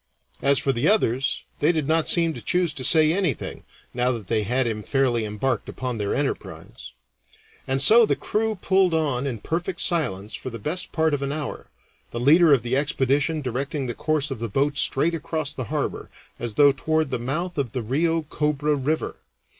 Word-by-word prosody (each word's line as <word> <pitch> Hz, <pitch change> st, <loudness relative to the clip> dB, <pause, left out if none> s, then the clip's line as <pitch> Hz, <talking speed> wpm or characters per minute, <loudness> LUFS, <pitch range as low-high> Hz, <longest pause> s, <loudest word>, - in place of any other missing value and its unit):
As 140 Hz, 0 st, +4 dB
for 135 Hz, +2 st, +1 dB
the 120 Hz, -, 0 dB
others, 135 Hz, -, +1 dB, 0.2 s
they 155 Hz, -, +3 dB
did 155 Hz, -4 st, -2 dB
not 160 Hz, 0 st, +2 dB
seem 165 Hz, -2 st, +3 dB
to -, -, -8 dB
choose 175 Hz, -3 st, +1 dB
to 135 Hz, -, -6 dB
say 155 Hz, +3 st, +4 dB
anything 180 Hz, -, -2 dB, 0.3 s
now 125 Hz, +1 st, +1 dB
that 110 Hz, -5 st, -7 dB
they 110 Hz, -2 st, +1 dB
had 125 Hz, +5 st, 0 dB
him 110 Hz, -2 st, -2 dB
fairly 120 Hz, -2 st, 0 dB
embarked 110 Hz, +4 st, -2 dB
upon 125 Hz, -3 st, -4 dB
their 100 Hz, -1 st, -1 dB
enterprise. 140 Hz, -, -5 dB, 0.7 s
And 135 Hz, 0 st, +1 dB
so 230 Hz, -, +7 dB
the -, -, +1 dB
crew 220 Hz, 0 st, -1 dB
pulled 190 Hz, -2 st, +2 dB
on 140 Hz, -4 st, 0 dB
in 125 Hz, -4 st, -3 dB
perfect 175 Hz, +3 st, -3 dB
silence 105 Hz, -, +1 dB
for -, -, -5 dB
the 115 Hz, -, -7 dB
best 155 Hz, -, -2 dB
part 160 Hz, -1 st, +1 dB
of 145 Hz, -, -1 dB
an 140 Hz, 0 st, -2 dB
hour, 150 Hz, -1 st, -5 dB, 0.4 s
the 120 Hz, -, -5 dB
leader 155 Hz, +6 st, +5 dB
of 135 Hz, -5 st, +4 dB
the 120 Hz, +2 st, -1 dB
expedition 145 Hz, +2 st, 0 dB
directing 135 Hz, +3 st, -3 dB
the 120 Hz, -, -2 dB
course 150 Hz, +2 st, 0 dB
of 130 Hz, -, -4 dB
the 115 Hz, 0 st, -3 dB
boat 140 Hz, +7 st, 0 dB
straight 155 Hz, +4 st, +3 dB
across 155 Hz, -2 st, -2 dB
the 130 Hz, -5 st, -5 dB
harbor, -, -, -3 dB, 0.3 s
as 120 Hz, -3 st, -4 dB
though 145 Hz, -1 st, +6 dB
toward 155 Hz, +1 st, -1 dB
the 125 Hz, -, -1 dB
mouth 155 Hz, +7 st, -3 dB
of 130 Hz, -5 st, -2 dB
the 125 Hz, -3 st, -3 dB
Rio 160 Hz, +7 st, 0 dB
Cobra 150 Hz, 0 st, -1 dB
River. 145 Hz, +3 st, -2 dB
140 Hz, 195 wpm, -23 LUFS, 125-160 Hz, 0.7 s, so